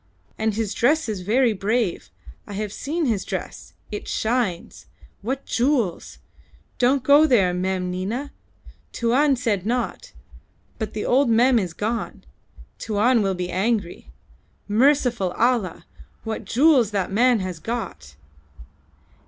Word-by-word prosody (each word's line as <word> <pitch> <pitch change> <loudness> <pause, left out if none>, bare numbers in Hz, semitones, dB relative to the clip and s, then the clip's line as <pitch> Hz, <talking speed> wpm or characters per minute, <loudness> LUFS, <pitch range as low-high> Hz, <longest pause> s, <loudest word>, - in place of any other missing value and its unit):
And 220 -1 -1
his 220 -2 -2
dress 300 +6 +2
is 210 -4 -3
very 230 +5 +2
brave. 210 0 -1 0.4
I 205 - -8
have 210 0 -4
seen 315 +3 -2
his 220 -7 0
dress. - - -6 0.2
It 210 - -6
shines! 220 -7 -2 0.3
What 265 +6 -4
jewels! 240 - -1 0.6
Don't 255 +1 +3
go 285 +3 +6
there, 195 -10 +3
Mem 180 0 -2
Nina. 220 +10 -4 0.6
Tuan 265 +5 +2
said 225 -7 -1
not; 245 +4 -3 0.7
but 220 -2 -4
the 210 - -3
old 265 +1 +3
Mem 240 +2 +4
is 180 -5 -3
gone. 225 +6 -4 0.6
Tuan 225 +3 +2
will 195 -2 0
be 180 0 -4
angry. 195 -1 -2 0.6
Merciful 235 -4 +2
Allah! 230 -7 0 0.4
what 220 0 -5
jewels 265 -3 +4
that 200 -3 -2
man 240 +3 +3
has 185 -3 -5
got!" 120 - -6
225 Hz, 130 wpm, -23 LUFS, 195-250 Hz, 0.7 s, go